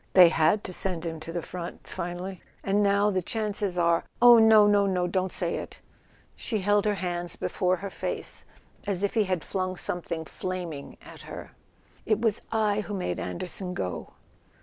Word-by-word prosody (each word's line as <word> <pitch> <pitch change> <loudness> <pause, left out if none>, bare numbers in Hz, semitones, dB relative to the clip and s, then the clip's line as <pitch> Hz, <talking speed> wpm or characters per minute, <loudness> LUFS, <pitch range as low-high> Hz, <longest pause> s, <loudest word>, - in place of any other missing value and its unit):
They 180 -2 +9
had 165 +6 +3
to 185 - -5
send 175 -2 -2
him 160 -1 -4
to 160 +1 -7
the 170 -1 -3
front 175 -1 -7
finally. 175 +2 -5 0.2
And 200 +1 +2
now 200 +1 +3
the 185 -1 0
chances 205 -2 -2
are 170 -1 +3
" - - -37
"Oh, 240 -1 +9
no, 220 -1 +7
no, 205 -1 +4
no—don't 185 0 0
say - - -1
it!" - - -8 0.6
She 220 - -2
held 205 +2 +3
her 210 -1 +2
hands 175 -2 -3
before 180 0 0
her 195 +2 -6
face - - -4 0.4
as 195 -1 0
if 200 - +1
he 220 -3 +3
had 185 -4 -1
flung 185 -1 -2
something 170 -2 -2
flaming 175 -5 -5
at - - -12
her. - - -8 0.6
"It 215 - +3
was 225 -2 +1
I 210 -2 +2
who 205 -1 -5
made 185 - -2
Anderson 180 +1 -4
go!" 90 - -4
185 Hz, 180 wpm, -27 LUFS, 175-205 Hz, 0.6 s, They